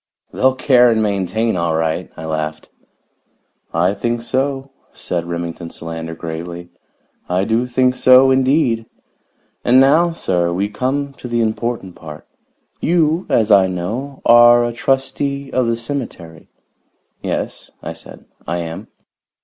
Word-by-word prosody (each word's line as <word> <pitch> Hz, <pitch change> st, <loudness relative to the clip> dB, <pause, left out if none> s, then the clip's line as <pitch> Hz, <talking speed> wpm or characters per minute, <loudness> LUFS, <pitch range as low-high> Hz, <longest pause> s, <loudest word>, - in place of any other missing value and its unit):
"They'll 130 Hz, 0 st, +2 dB
care 125 Hz, -2 st, +4 dB
and 110 Hz, -1 st, +2 dB
maintain, 105 Hz, +2 st, 0 dB
all 85 Hz, -2 st, 0 dB
right!" 80 Hz, -1 st, -1 dB
I 80 Hz, -, -7 dB
laughed. 80 Hz, -1 st, -4 dB, 1.0 s
"I 90 Hz, +3 st, +1 dB
think 120 Hz, +3 st, -2 dB
so," 135 Hz, +2 st, -2 dB, 0.2 s
said 85 Hz, -1 st, -4 dB
Remington 85 Hz, -1 st, -5 dB
Solander 80 Hz, 0 st, -7 dB
gravely. 85 Hz, +2 st, -7 dB, 0.6 s
"I 90 Hz, +1 st, +1 dB
do 115 Hz, +4 st, 0 dB
think 125 Hz, +1 st, +2 dB
so, 130 Hz, +1 st, +6 dB
indeed! 130 Hz, -4 st, +2 dB, 0.8 s
And 125 Hz, +2 st, +5 dB
now, 155 Hz, +6 st, +4 dB
sir, 90 Hz, -, -1 dB
we 95 Hz, +4 st, -1 dB
come 135 Hz, +6 st, -2 dB
to -, -, -7 dB
the 120 Hz, -1 st, 0 dB
important 110 Hz, -3 st, -3 dB
part. 75 Hz, -3 st, -11 dB, 0.5 s
You, 165 Hz, +1 st, +1 dB
as 110 Hz, -1 st, +2 dB
I 95 Hz, -2 st, +6 dB
know, 110 Hz, +10 st, -5 dB
are 120 Hz, 0 st, +7 dB
a 120 Hz, -, -3 dB
trustee 135 Hz, +2 st, -1 dB
of 130 Hz, -2 st, +1 dB
the 115 Hz, 0 st, 0 dB
cemetery." 115 Hz, -, -6 dB, 0.7 s
"Yes," -, -, -4 dB
I -, -, -5 dB
said, -, -, -13 dB, 0.2 s
"I 85 Hz, -, -1 dB
am." 85 Hz, +5 st, -6 dB
115 Hz, 135 wpm, -18 LUFS, 85-130 Hz, 1.0 s, are